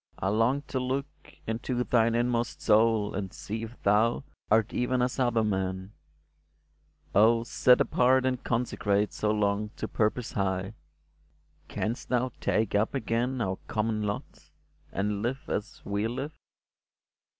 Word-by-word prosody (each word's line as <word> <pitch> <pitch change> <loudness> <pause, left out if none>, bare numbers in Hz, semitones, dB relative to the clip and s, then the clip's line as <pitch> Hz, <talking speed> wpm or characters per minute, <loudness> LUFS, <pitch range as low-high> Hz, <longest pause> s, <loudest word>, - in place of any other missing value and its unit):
I 95 - -1
long 115 +7 +2
to 130 - -3
look 130 +2 -1 0.4
Into 120 +2 -2
thine 115 -2 +2
inmost 120 0 0
soul, 110 -1 +3
and 95 -1 -4
see 110 +2 -5
if 115 +2 -8
thou 110 +6 +3 0.3
Art 110 0 +3
even 125 +1 0
as 125 +2 0
other 120 -3 +2
men! 95 -2 -2 1.2
Oh, 115 +3 +5
set 125 +1 +4
apart 130 +1 +3
And 130 0 -1
consecrate 105 -4 0
so 105 - -1
long 105 0 +1
to - - -4
purpose 110 +2 0
high, 95 0 -1 0.9
Canst 115 +3 -3
thou 125 0 +1
take 110 -1 +1
up 105 +6 +1
again 125 0 -1
our 95 -3 -2
common 110 0 -1
lot, 105 -1 -5 0.4
And 100 +1 -1
live 130 +4 -3
as 105 - -4
we 100 +2 -1
live 135 +6 -4
115 Hz, 140 wpm, -28 LUFS, 105-125 Hz, 1.2 s, Oh